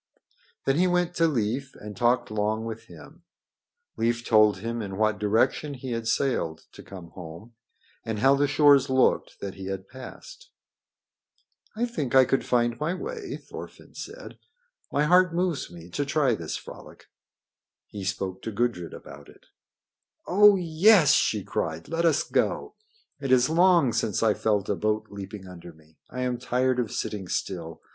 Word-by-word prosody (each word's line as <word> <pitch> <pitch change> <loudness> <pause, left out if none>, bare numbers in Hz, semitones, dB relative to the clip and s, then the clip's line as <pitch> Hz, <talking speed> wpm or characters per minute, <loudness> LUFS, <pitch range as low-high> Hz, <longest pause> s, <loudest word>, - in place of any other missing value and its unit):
Then 135 +1 +2
he 180 +2 +3
went 180 -1 +1
to 165 0 +4
Leif 130 0 -2
and 105 0 -9
talked 120 +3 +1
long 110 +1 -1
with 115 0 -7
him. - - -14 0.8
Leif 120 +1 0
told 110 -3 +5
him 115 +4 -4
in 95 -2 -6
what 110 -2 +1
direction 110 +7 +1
he 130 0 -7
had 115 -1 -3
sailed 85 - -1
to - - -12
come 90 -4 -11
home, 90 +6 -11 0.5
and 110 -1 -3
how 135 +6 +4
the 145 +1 +2
shores 145 -1 +5
looked 130 0 +1
that 100 -1 -5
he 95 -1 -8
had 95 0 -5
passed. - - -12 1.3
"I 235 +3 0
think 150 - -3
I 130 -1 +7
could 135 - 0
find 120 -1 +1
my 160 +4 -1
way," 430 - -6
Thorfinn - - -11
said. - - -9 0.5
"My 145 - +1
heart 180 +2 +4
moves 175 -4 -1
me 85 -1 -12
to 145 - -1
try 140 -3 +1
this 85 -7 -4
frolic." - - -12 0.8
He 100 -2 -8
spoke 95 0 -3
to 115 - -5
Gudrid 105 -6 -2
about 70 0 -12
it. - - -19 0.8
"Oh, 205 +2 +6
yes!" 175 -1 +5
she 105 -8 +2
cried. 80 -2 -3
"Let 165 +1 -1
us 160 -3 +3
go. - - -1 0.5
It 135 -2 -3
is 130 +3 +4
long 170 -7 +4
since 105 +1 0
I 110 -2 +4
felt 105 -2 0
a - - +1
boat 110 +1 -2
leaping 100 -1 -8
under 85 -1 -11
me. 80 0 -24
I 125 - -5
am 125 -1 -1
tired 125 +1 0
of 115 -4 -2
sitting 100 -4 -4
still. 85 -3 -4
120 Hz, 165 wpm, -26 LUFS, 100-145 Hz, 1.3 s, I